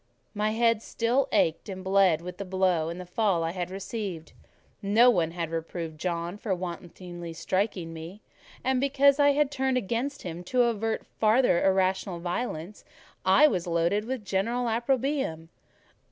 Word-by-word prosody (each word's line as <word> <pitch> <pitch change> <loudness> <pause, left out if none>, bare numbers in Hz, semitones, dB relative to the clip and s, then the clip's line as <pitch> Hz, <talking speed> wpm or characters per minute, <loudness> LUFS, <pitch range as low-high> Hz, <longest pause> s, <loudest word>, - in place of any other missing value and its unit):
My 210 0 0
head 230 0 +2
still 245 +4 0
ached 165 +6 +1
and 190 -1 -6
bled 190 -4 +3
with 180 +1 -8
the - - -2
blow 185 -4 +1
and 180 +1 -7
fall 185 -3 +1
I 165 - -1
had 180 0 -4
received: 190 -4 -6 0.5
no 225 +5 +5
one 170 -6 +1
had 165 -1 -4
reproved 165 -1 -5
John 170 +2 -3
for 200 -4 -1
wantonly 175 -1 -7
striking 185 -1 -2
me; 165 +6 -9 0.4
and 260 -1 +1
because 280 +1 +4
I 285 0 +5
had 290 -1 +1
turned 265 -2 0
against 250 +5 -2
him 175 0 -6
to 250 +5 +2
avert 225 -1 -1
farther 220 -4 +2
irrational 190 -1 +1
violence, 175 0 -4 0.4
I 190 +11 +6
was 180 - +1
loaded 170 +5 +1
with 250 -3 -4
general 235 +6 0
opprobrium. 235 - -1
195 Hz, 155 wpm, -27 LUFS, 175-235 Hz, 0.5 s, I